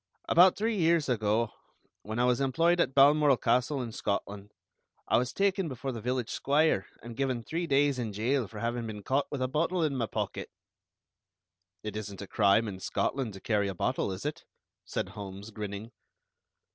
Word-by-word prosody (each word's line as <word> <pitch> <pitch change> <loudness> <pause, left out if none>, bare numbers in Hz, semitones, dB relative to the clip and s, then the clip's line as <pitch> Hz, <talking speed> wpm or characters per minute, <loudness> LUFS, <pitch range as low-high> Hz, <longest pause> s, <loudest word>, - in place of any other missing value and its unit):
About 180 +2 +6
three 220 +1 0
years 165 -2 +3
ago, 110 -2 +1 0.5
when 110 +2 -5
I 120 - +3
was 125 +1 +2
employed 165 +6 +2
at 135 -6 +1
Balmoral 145 0 +6
Castle, 125 +3 +1
in 115 - -6
Scotland, 100 -1 -3 0.6
I - - +4
was 125 +1 -2
taken 195 -2 +1
before 135 -1 -4
the 115 -3 -6
village 125 0 -2
squire 145 -7 +2 0.2
and 115 0 -8
given 130 -3 -1
three 170 +7 -3
days 140 -2 +2
in 115 -3 -2
jail 115 +4 0
for 110 - -11
having 115 0 -2
been 105 -2 -7
caught 135 +5 +1
with 140 -3 -2
a - - +1
bottle 165 +6 0
in 150 -3 0
my 120 -3 -1
pocket." - - -4 1.3
"It 105 -1 -5
isn't 100 -2 -6
a - - -6
crime 105 +3 +3
in 95 -3 -6
Scotland 125 +3 -2
to 95 - -10
carry 105 -3 +1
a 95 - -4
bottle, 95 - -1
is 95 +6 -6
it?" 150 - -3 0.4
said - - -3
Holmes, 100 +1 -8
grinning. 105 +1 -6
125 Hz, 185 wpm, -29 LUFS, 105-145 Hz, 1.3 s, About